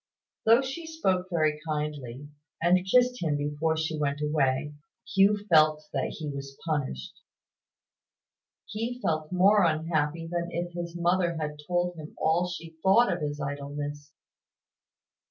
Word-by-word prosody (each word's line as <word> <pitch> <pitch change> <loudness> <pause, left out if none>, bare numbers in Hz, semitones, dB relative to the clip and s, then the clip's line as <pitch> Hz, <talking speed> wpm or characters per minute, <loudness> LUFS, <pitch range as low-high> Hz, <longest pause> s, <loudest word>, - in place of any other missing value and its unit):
Though 230 +4 +6
she 295 +5 -5
spoke 190 - 0
very 155 -3 +1
kindly, 150 -4 -4 0.3
and 180 +2 +3
kissed 250 0 +4
him 155 -4 +1
before 150 +2 -1
she 160 -1 -2
went 145 -1 0
away, 150 -1 0 0.3
Hugh 200 +2 +4
felt 155 -2 +4
that 135 -2 -2
he 155 - -5
was 140 -1 -6
punished. 135 - -2 1.5
He 230 +4 -4
felt 155 -7 -1
more 195 +3 +5
unhappy 160 0 0
than 170 +1 -2
if 175 +1 -4
his 170 0 -5
mother 175 -1 +1
had 150 -1 -4
told 175 0 0
him 155 -1 -9
all 170 +3 +2
she 165 -2 -8
thought 195 +6 +5
of 175 - -4
his 145 -1 -3
idleness. 145 +1 -5
160 Hz, 135 wpm, -28 LUFS, 150-180 Hz, 1.5 s, Though